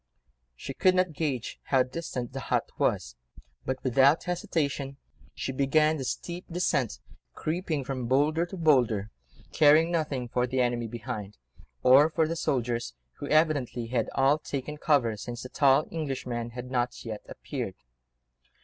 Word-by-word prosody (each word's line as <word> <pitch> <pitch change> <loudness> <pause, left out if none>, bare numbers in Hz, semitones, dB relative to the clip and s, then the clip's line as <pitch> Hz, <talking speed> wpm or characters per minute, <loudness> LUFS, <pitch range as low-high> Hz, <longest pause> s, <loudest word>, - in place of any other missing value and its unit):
She 135 - -7
could 185 +7 +3
not 185 -3 +2
gauge 140 -6 -3
how 135 -2 +3
distant 130 -2 -5
the 135 - -4
hut - - 0
was, - - 0 0.5
but 130 - 0
without 135 +4 +4
hesitation 145 -6 -2 0.4
she - - -3
began 150 +4 +2
the 135 - -4
steep 175 +7 -4
descent, 140 - 0 0.4
creeping 160 -3 -2
from 130 -2 -4
boulder 150 +6 +2
to 190 - -8
boulder, 120 - +2 0.4
caring 155 +2 +5
nothing 145 -7 -1
for 125 +1 0
the 130 +1 -1
enemy 120 -2 +1
behind, 110 -3 -6 0.5
or 135 +5 +7
for 160 0 +1
the 165 - -2
soldiers, 120 - -1 0.2
who 145 - -5
evidently 145 -6 +2
had 120 -2 0
all 135 +3 +4
taken 150 0 -5
cover 140 -8 +2
since 120 +3 -6
the 130 - -8
tall 140 +2 +4
Englishman 130 -7 -3
had 125 +1 -8
not 120 -1 -1
yet 110 -2 -5
appeared. - - -5
135 Hz, 150 wpm, -28 LUFS, 125-155 Hz, 0.5 s, or